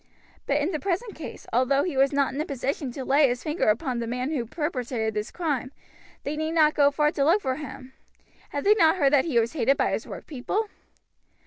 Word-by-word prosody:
But 285 - +2
in 300 +5 0
the 310 - -2
present 395 +5 -2
case, 315 - -9
although 260 +3 +3
he 345 -6 -3
was 270 +1 +3
not 280 -2 +1
in 285 - -2
a - - -2
position 275 0 -3
to 265 0 -6
lay 280 +2 +4
his 245 0 -2
finger 310 +2 -1
upon 245 +3 0
the 230 - -3
man 250 +4 -2
who 250 -7 -2
perpetrated 250 -7 -2
this 210 +1 -3
crime, 290 -7 -2 0.5
they 285 - -3
need 315 +1 -2
not 310 -2 +4
go 285 -1 +5
far 300 +1 +1
to 280 - 0
look 335 +8 +4
for 260 -1 -1
him. 265 -3 -9 0.6
Had 285 - -3
they 415 - +6
not 330 -6 +4
heard 285 -6 +2
that 275 -2 +4
he 295 -8 0
was 230 0 +2
hated 275 -2 +2
by - - +1
his - - -3
workpeople? 380 - -4
280 Hz, 225 wpm, -26 LUFS, 255-315 Hz, 0.6 s, they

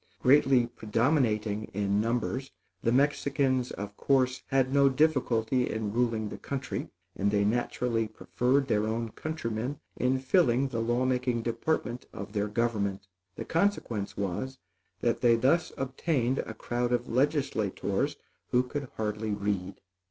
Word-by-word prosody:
Greatly 135 -2 +5
predominating 110 -2 0
in 100 0 +1
numbers, 120 +3 -1 0.3
the 115 - +1
Mexicans 135 -1 +2
of 100 0 -6
course 130 -2 +2
had 135 -1 +1
no 140 -1 +6
difficulty 130 -4 +2
in 110 -2 -2
ruling 115 -2 +1
the - - -8
country; 135 -1 -4 0.3
and 100 +1 +1
they 100 0 +2
naturally 115 0 0
preferred 125 +5 0
their 105 -3 +1
own 115 +1 -2
countrymen 130 -2 -4 0.2
in 130 +1 +1
filling 130 -1 +3
the 120 -3 -3
law 120 +2 +1
making 125 -2 0
department 120 +1 -2
of 100 +1 -7
their 105 -1 0
government. 105 -3 -1 0.3
The - - -6
consequence 160 - 0
was, 100 +8 -3 0.4
that - - +1
they 120 -1 +5
thus 135 +9 +2
obtained 135 -1 0
a 115 - -4
crowd 120 +2 -2
of 120 0 0
legislators 130 -6 0 0.3
who 125 +1 +3
could 140 +2 -5
hardly 105 0 -2
read. 100 -2 -3
120 Hz, 135 wpm, -29 LUFS, 110-130 Hz, 0.4 s, no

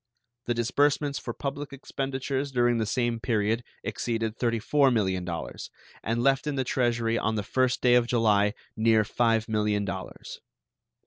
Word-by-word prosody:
The 120 - 0
disbursements 140 +4 +1
for - - -5
public 140 +1 -5
expenditures 135 0 -3
during 120 -2 +2
the 110 - -1
same 120 0 0
period 110 0 0 0.2
exceeded 115 -2 -2
$34 125 +4 +2
millions, 95 -6 -2 0.3
and 115 +2 -1
left 135 +2 +2
in 150 - -1
the 130 - 0
Treasury 120 -2 0
on 110 - 0
the 105 - -1
first 130 +4 0
day 125 -1 +5
of 120 -1 +4
July 105 -3 +2 0.2
near 110 -1 +4
$5 115 +1 +1
millions. 105 -3 -2
120 Hz, 140 wpm, -27 LUFS, 110-130 Hz, 0.3 s, day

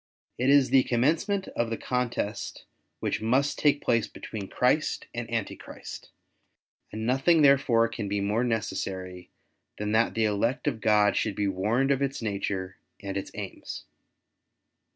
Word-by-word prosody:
It 130 +2 +2
is 140 -3 +5
the 135 -1 +7
commencement 165 - +1
of 120 -1 -1
the 115 - -2
contest 120 -5 -3 0.4
which - - -1
must 130 +6 +1
take 145 -1 +3
place 115 -2 +2
between 105 -1 -7
Christ 130 +9 +1
and 120 -1 -5
Antichrist; 115 -3 -5 0.8
and 110 +1 -4
nothing 135 +6 +4
there 140 -1 +7
fore 115 -4 +3
can 110 -3 -5
be 100 +1 -1
more 105 +4 +1
necessary 95 -6 -3 0.5
than 105 0 -2
that 110 +2 +2
the 110 -1 +2
elect 110 +4 0
of 110 - -1
God 105 -1 +4
should 110 -3 0
be 105 -1 0
warned 110 +8 +1
of 140 0 +1
its 140 0 -1
nature 100 -3 -3 0.2
and 100 -1 -5
its 100 - -3
aims. - - -7
115 Hz, 150 wpm, -27 LUFS, 105-130 Hz, 0.8 s, the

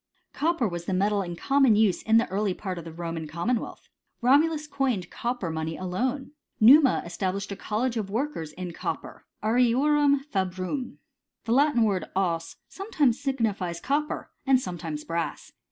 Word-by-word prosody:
t - - -16
Copper 320 -6 +1
was 175 -2 -5
the 190 - -1
metal 200 +2 +2
in 175 -2 -5
common 270 +3 +3
use 205 -5 +3
in 220 0 +4
the 230 - +3
early 195 -1 0
part 185 -4 -5
of 170 - -10
the 165 - -7
Roman 165 -1 -5
commonwealth. 220 +10 -3 0.3
Romulus 300 +5 +3
coined 260 - -1
copper 235 -8 -3
money 160 0 -3
alone. 250 +10 -2 0.3
Numa 270 +5 +7
established 190 +3 -3
a - - -3
college 230 +5 -2
of 205 -3 -3
workers 225 - -3
in 180 -1 -6
copper - - -6 0.2
(arariorumfabrum),^ 250 -3 +1 0.5
The 225 - -3
Latin 280 -2 +4
word 200 -4 +1
<bs 165 -3 -1
sometimes 305 - 0
signifies 215 -11 -1
copper, 295 +2 -2
and 265 -2 +4
sometimes 170 -8 -5
brass. 165 -2 -4
215 Hz, 155 wpm, -26 LUFS, 180-270 Hz, 0.5 s, Numa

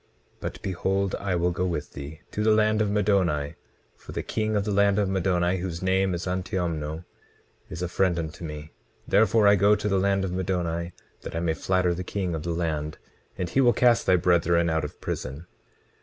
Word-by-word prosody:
But - - -5
behold, 95 +1 -1
I 100 -2 -1
will 90 +1 +1
go 90 +1 -2
with 85 -5 -3
thee 70 +3 -8
to 105 - -3
the 110 - +3
land 110 0 +3
of 105 - +1
Middoni; 95 -8 +1 0.4
for - - -12
the - - -3
king 110 -1 -1
of 100 - +1
the 105 - -1
land 100 0 +3
of 105 -2 +2
Middoni, 95 -1 +1
whose 85 -1 -4
name 95 0 +2
is 85 - -5
Antiomno, 85 -4 -3 0.6
is 85 - -5
a - - 0
friend 90 0 +1
unto 80 +1 -5
me; 75 -1 -7 0.4
therefore 110 0 +4
I 100 - +7
go 100 +2 +4
to 105 0 -3
the 95 -2 +2
land 95 0 +1
of 90 - -3
Middoni, 90 -2 -2 0.3
that - - -7
I - - 0
may 85 -1 0
flatter 90 +1 +1
the 90 +2 -4
king 90 -2 -3
of 80 - -3
the 85 - -5
land, 80 -3 -2 0.4
and 90 - -2
he 135 - +3
will 120 -2 +5
cast 120 -2 +3
thy 95 - +6
brethren 85 -1 +3
out 80 -1 0
of 75 - -7
prison. 70 +6 -5
90 Hz, 205 wpm, -26 LUFS, 85-100 Hz, 0.6 s, I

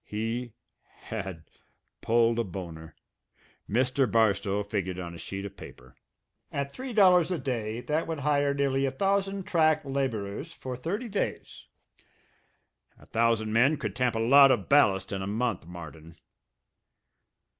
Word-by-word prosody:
He 115 +2 -4 0.3
had 95 -7 -7 0.6
pulled 115 0 +2
a - - +2
boner. 85 -5 -8 0.7
Mr. 130 +1 +1
Barstow 105 -2 +2
figured 100 -3 -3
on 85 -1 -6
a 85 - -10
sheet 95 +4 -6
of 100 -1 -8
paper. - - -13 0.6
"At 140 0 -3
three 260 0 -6
dollars 185 -6 +5
a 180 - -1
day, 120 -5 -3
that 155 +5 -1
would 160 -3 -4
hire 145 0 +2
nearly 140 -1 +1
a - - -1
thousand 195 +5 0
track 155 -3 +2
labourers 135 - -3
for 130 -1 -6
thirty 195 - -4
days. 205 -2 -4 1.3
A - - -17
thousand 115 -1 +1
men 130 +7 +4
could - - -4
tamp 125 -2 0
a - - 0
lot 135 +4 +7
of - - +1
ballast 100 -10 +3
in 95 -1 -3
a 95 - -4
month, 110 -5 -2
Martin." 80 -2 -11
120 Hz, 145 wpm, -28 LUFS, 100-140 Hz, 1.3 s, lot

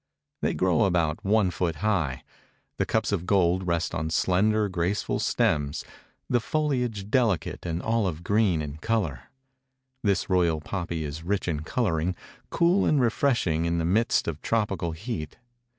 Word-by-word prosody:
They - - 0
grow 90 -1 +3
about 85 -5 0
one 100 -2 +3
foot 85 -2 -1
high. 80 -9 -1 0.5
The - - 0
cups - - 0
of 85 - -2
gold 95 -1 +2
rest 85 -1 0
on 80 -2 -2
slender, 105 +6 +2
graceful 90 +2 -1
stems; 70 -2 0 0.4
the 120 - +2
foliage 125 -7 -1
delicate 110 - +1
and 85 +1 -3
olive 100 -8 0
green 100 -5 +2
in 75 0 -6
color. 80 - -1 0.8
This 100 -3 +1
royal 85 -4 +2
poppy 85 -1 -4
is 75 +1 -5
rich 95 +3 -1
in 80 -4 -1
coloring, 85 -1 -1 0.3
cool 175 +3 +3
and 150 - +3
refreshing 115 - +1
in 85 0 0
the 80 - 0
midst 110 +7 +2
of 80 -2 -4
tropical 100 -7 -1
heat. 80 -4 -5
90 Hz, 150 wpm, -26 LUFS, 80-110 Hz, 0.8 s, grow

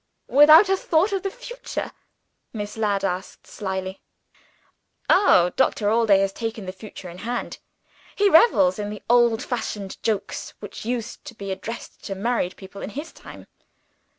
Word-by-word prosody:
"Without 310 +7 +8
a 385 - +3
thought 365 +2 +1
of 390 -1 -1
the 390 - -2
future?" - - -6 0.6
Miss 205 -2 -5
Ladd 205 -3 0
asked 180 0 -4
slyly. 190 -1 -5 1.1
"Oh, 180 - +5
Doctor 210 -5 +1
Allday 220 -4 +4
has 195 0 0
taken 225 -2 -5
the 185 - -4
future 195 -1 -11
in 175 +1 -10
hand! 240 +5 -4 0.6
He 410 - +3
revels 305 - +5
in 205 0 -3
the 210 -1 -8
old 240 0 +4
fashioned 210 -6 -5
jokes, 205 -3 -3
which 205 +1 -9
used 235 -1 -4
to 235 - -9
be 200 -2 -6
addressed 205 +5 -7
to 195 - -4
newly 190 - -8
married 230 -7 0
people, 195 +1 -11
in - - -5
his 295 +9 -7
time. - - -12
220 Hz, 160 wpm, -23 LUFS, 195-275 Hz, 1.1 s, Without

